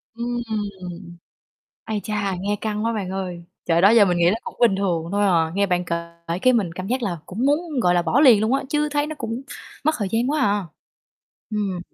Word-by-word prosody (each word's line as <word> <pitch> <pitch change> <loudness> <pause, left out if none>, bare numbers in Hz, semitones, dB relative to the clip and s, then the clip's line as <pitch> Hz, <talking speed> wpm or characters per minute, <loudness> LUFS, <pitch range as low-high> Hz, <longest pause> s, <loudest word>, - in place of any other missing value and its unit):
Ừm, 240 +1 -3 1.5
ây 215 -1 -2
cha, 200 -3 -2
nghe 205 +2 -1
căng 215 0 -2
quá 230 - +1
bạn 200 -5 -3
ơi, 180 -3 -5 0.2
trời, 170 0 +2
đó 195 - +7
giờ 225 -2 +7
mình 180 -2 +1
nghĩ 170 - +3
nó 215 - +1
cũng - - -7
bình 230 -5 +4
thường 175 -4 -1
thôi 205 0 +2
à, 165 -4 +2
nghe 200 0 +2
bạn 180 -1 0
kể 170 -1 -1 0.5
cái 255 - +5
mình 200 -9 +1
cảm 185 +2 -6
giác 255 +3 -1
là 175 -6 -2
cũng 225 +8 -2
muốn, 295 -1 0
gọi 180 -3 +3
là, 175 - +3
bỏ 235 - +2
liền 245 -8 +7
luôn 220 +5 +1
á, 275 - +1
chứ 300 +1 +1
thấy 290 0 0
nó 310 - -5
cũng 230 +2 -4 0.4
mất 310 +1 +3
thời 205 -4 -1
gian 235 +5 +1
quá 300 0 0
à. 205 -6 +1 0.8
Ừm. 200 -4 -2
205 Hz, 225 wpm, -22 LUFS, 185-245 Hz, 1.5 s, đó